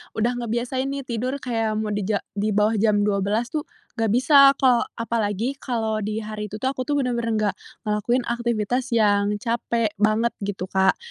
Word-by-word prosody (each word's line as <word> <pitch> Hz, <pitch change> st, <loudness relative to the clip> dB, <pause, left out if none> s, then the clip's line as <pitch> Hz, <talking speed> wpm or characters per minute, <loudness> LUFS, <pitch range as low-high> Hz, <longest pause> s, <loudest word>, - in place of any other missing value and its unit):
udah 245 Hz, +3 st, 0 dB
ngebiasain 240 Hz, +3 st, -2 dB
nih 275 Hz, 0 st, -4 dB
tidur 250 Hz, +2 st, -2 dB
kayak 225 Hz, -3 st, -1 dB
mau 215 Hz, 0 st, -2 dB
di 205 Hz, 0 st, -1 dB
ja 210 Hz, -2 st, 0 dB
di 205 Hz, +1 st, -1 dB
bawah 210 Hz, +2 st, +3 dB
jam 210 Hz, -1 st, +3 dB
12.00 210 Hz, +3 st, 0 dB
tuh 300 Hz, -1 st, -3 dB, 0.3 s
nggak 225 Hz, -, +2 dB
bisa, 275 Hz, +4 st, +6 dB
kok 255 Hz, -3 st, +3 dB
apalagi 230 Hz, +1 st, -1 dB
kalau 220 Hz, -4 st, -1 dB
di 215 Hz, +1 st, -3 dB
hari 210 Hz, 0 st, -5 dB
itu 210 Hz, -, -8 dB
tuh 260 Hz, +4 st, -1 dB
aku 255 Hz, -2 st, -5 dB
tuh 290 Hz, -, +1 dB
benar-benar 245 Hz, -4 st, -1 dB
nggak 210 Hz, -2 st, 0 dB, 0.3 s
ngelakuin 215 Hz, +4 st, 0 dB
aktivitas 235 Hz, +1 st, -1 dB
yang 205 Hz, -1 st, +3 dB
capek 230 Hz, 0 st, -1 dB
banget 215 Hz, +2 st, +2 dB
gitu, 200 Hz, -2 st, -4 dB
Kak. 190 Hz, +1 st, +2 dB
225 Hz, 180 wpm, -23 LUFS, 210-245 Hz, 0.3 s, bisa